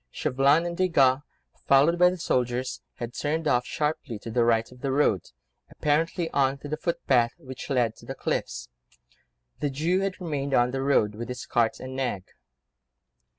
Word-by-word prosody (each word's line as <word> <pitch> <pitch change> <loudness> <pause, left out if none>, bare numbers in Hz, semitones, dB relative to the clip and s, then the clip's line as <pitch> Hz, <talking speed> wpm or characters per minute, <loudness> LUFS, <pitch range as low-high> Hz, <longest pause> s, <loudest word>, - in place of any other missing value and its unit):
Chauvelin 140 - +2
and 170 0 -3
Desgas, 140 -8 +3 0.5
followed 145 +6 +5
by 180 0 +7
the 180 - -4
soldiers, 125 -4 -1
had 120 0 -6
turned 155 +3 -1
off 125 -3 +2
sharply 150 -6 -2
to 115 +2 -8
the 120 +1 +2
right 115 0 +2
of 125 -1 -15
the 135 - -1
road, 130 - +2 0.4
apparently 165 +3 0
on 135 0 +2
to 140 - -9
the 150 - -2
footpath, 130 -8 +1
which 130 +1 -9
led 120 -5 +1
to - - -15
the - - -5
cliffs. - - -3 0.9
The 145 - 0
Jew 160 +7 0
had 195 0 -2
remained 140 -6 -2
on 120 0 +3
the 135 0 -2
road, 135 -6 +2
with 115 +3 -6
his 125 0 -5
cart 115 -2 +1
and 130 0 -7
nag. 125 -8 -2
135 Hz, 175 wpm, -26 LUFS, 120-155 Hz, 0.9 s, by